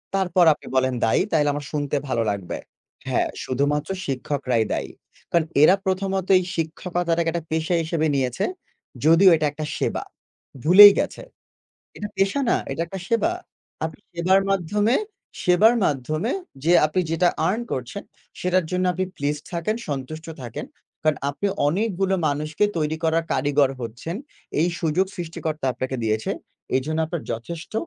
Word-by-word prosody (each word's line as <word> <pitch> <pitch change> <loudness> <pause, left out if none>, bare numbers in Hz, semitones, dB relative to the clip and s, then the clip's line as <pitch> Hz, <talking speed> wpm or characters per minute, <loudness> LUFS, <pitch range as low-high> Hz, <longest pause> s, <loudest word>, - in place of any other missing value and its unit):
তারপর 185 -2 +3
আপনি - - -15
বলেন 130 0 +2
দায়ী, 115 - +3
তাইলে 150 -2 +3
আমার 145 0 -5
শুনতে 145 -1 -2
ভালো 115 -3 0
লাগবে। 100 -3 -3 0.5
হ্যাঁ, - - +1 0.2
শুধুমাত্র 145 +5 0 0.2
শিক্ষকরাই 130 -3 -1
দায়ী। - - -3 0.4
কারণ 170 -2 +3 0.2
এরা 170 +5 +7
প্রথমত 190 0 -1
এই 185 - +1
শিক্ষকতাটাকে 170 +1 -1
একটা 170 -1 -3
পেশা 160 +2 0
হিসেবে 160 -1 0
নিয়েছে, 130 -3 0 0.6
যদিও 165 +4 +7
এটা 155 - 0
একটা 155 +1 -5
সেবা। - - -1 0.6
ভুলেই 200 +5 +10
গেছে, - - -2 0.8
এটা 210 - -5
পেশা 195 +8 +1
না - - +4
এটা 165 - -2
একটা 190 +3 -6
সেবা। 230 +9 +2 0.5
আপনি 160 -2 -5
সেবার 180 +3 +3
মাধ্যমে 205 +5 +1 0.5
সেবার 205 +6 +5
মাধ্যমে 155 - -1 0.3
যে 170 - +4
আপনি 155 +4 0
যেটা 165 +2 +3 0.2
earn 215 +6 0
করছেন, 130 +10 -4 0.4
সেটার 180 0 +2
জন্য 180 0 0
আপনি 185 +1 -1
pleased 145 +1 -2
থাকেন, 170 +5 -1
সন্তুষ্ট 145 +3 -5 0.2
থাকেন। 120 -2 -6 0.4
কারণ 155 -1 +4 0.2
আপনি 145 +8 -3 0.2
অনেকগুলো 195 +2 0
মানুষকে 155 +6 0
তৈরি 155 -1 0
করার 165 +1 +2
কারিগর 145 -2 +2
হচ্ছেন, 120 - -5 0.4
এই 170 - +3
সুযোগ 170 +3 +1
সৃষ্টিকর্তা 160 -4 -4
আপনাকে 130 +2 -3
দিয়েছে। 110 0 0 0.5
এজন্য 155 +5 -1
আপনার 165 0 -4
যথেষ্ট 155 - -7
160 Hz, 145 wpm, -23 LUFS, 145-185 Hz, 0.8 s, ভুলেই